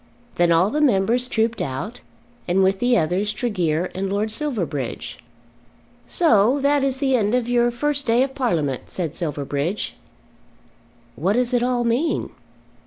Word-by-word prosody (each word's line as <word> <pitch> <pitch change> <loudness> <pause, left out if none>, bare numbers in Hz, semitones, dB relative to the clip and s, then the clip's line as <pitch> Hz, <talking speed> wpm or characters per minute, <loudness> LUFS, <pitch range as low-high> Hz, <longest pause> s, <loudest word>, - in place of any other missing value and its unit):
Then 175 -1 +3
all 175 +5 +3
the 300 - 0
members 245 -1 +2
trooped 225 -1 0
out, 140 - -5 0.5
and 185 +2 +2
with 190 0 +2
the 245 +1 +3
others 190 +4 0
Tregear 180 -7 -1
and 195 +1 -3
Lord 210 +2 -1
Silverbridge. 175 - -3 0.9
"So 250 - +3
that 285 0 +2
is 270 -1 0
the 265 -1 +1
end 215 -1 +1
of 250 -2 0
your 240 0 +2
first 285 +3 -1
day 235 +3 +4
of 270 0 -3
Parliament," 165 - -1
said 165 -5 -4
Silverbridge. 150 +3 -3 1.2
"What 185 +7 0
does 250 +2 +1
it 245 - +3
all 245 0 +1
mean?" 245 +8 0
220 Hz, 150 wpm, -22 LUFS, 180-250 Hz, 1.2 s, day